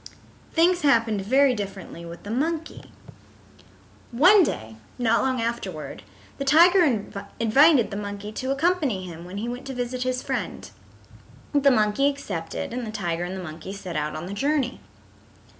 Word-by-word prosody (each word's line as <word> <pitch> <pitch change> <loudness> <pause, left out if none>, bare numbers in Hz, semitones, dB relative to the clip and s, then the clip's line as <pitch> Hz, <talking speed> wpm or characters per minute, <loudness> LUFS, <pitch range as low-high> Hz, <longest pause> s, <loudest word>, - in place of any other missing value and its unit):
Things 350 +2 +3
happened 230 -8 +3
very 265 +6 +4
differently 195 -5 -7
with 170 0 -10
the 205 - -6
monkey. 315 +6 -3 1.2
One 360 - +6
day 110 - -2 0.2
not 230 -2 +2
long 260 -1 0
afterward 190 - -4 0.4
the - - -1
tiger 340 +6 +6 0.6
invited 250 +2 +5
the 200 - -4
monkey 205 0 -6
to 260 +4 -4
accompany 275 - 0
him 170 -1 -9
when 185 +2 -8
he 220 +3 -3
went 245 +2 -6
to 265 - -5
visit 250 0 -3
his 255 0 -1
friend. - - -4 0.8
The 285 -1 +5
monkey 220 +3 +3
accepted, 195 -9 -5
and 250 0 -3
the - - -5
tiger 175 -5 -2
and 185 +2 -5
the 185 - -6
monkey 160 +3 -8
set 190 -4 -7
out 150 0 -2
on 155 +2 -5
the 190 - -6
journey. 275 +3 0
230 Hz, 160 wpm, -24 LUFS, 190-275 Hz, 1.2 s, One